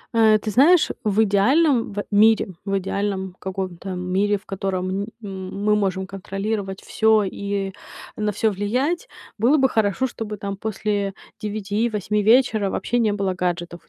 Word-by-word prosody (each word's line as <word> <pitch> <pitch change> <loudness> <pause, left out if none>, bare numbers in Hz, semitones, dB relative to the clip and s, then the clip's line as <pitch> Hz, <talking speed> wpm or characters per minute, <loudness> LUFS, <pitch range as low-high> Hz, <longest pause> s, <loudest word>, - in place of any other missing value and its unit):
Э, 220 -1 +6
ты 215 +1 -4
знаешь, 300 - +5
в 215 +1 +3
идеальном 235 +5 +3
в 205 0 -3
мире 215 0 +4 0.2
в 195 -1 0
идеальном 190 -1 -3
каком-то 190 -1 -5
мире, 190 +3 0
в - - -19
котором, 190 -1 -2
н 200 - -4 0.2
м 190 0 -6
мы 210 0 +4
можем 190 -2 0
контролировать 195 +1 -4
всё 220 -1 +3
и 200 0 -3 0.4
на 210 -1 -1
всё 215 +2 +1
влиять, 250 - -1 0.3
было 250 +8 +4
бы 265 -2 +4
хорошо, 220 +1 +1
чтобы 220 -4 -5
там 200 0 -4
после 205 -1 -2 0.3
9-8 210 0 -1
вечера 220 -2 +3
вообще 240 +5 -1
не 220 -2 +2
было 200 -2 -1
гаджетов 175 -1 -3
205 Hz, 150 wpm, -22 LUFS, 195-220 Hz, 0.4 s, Э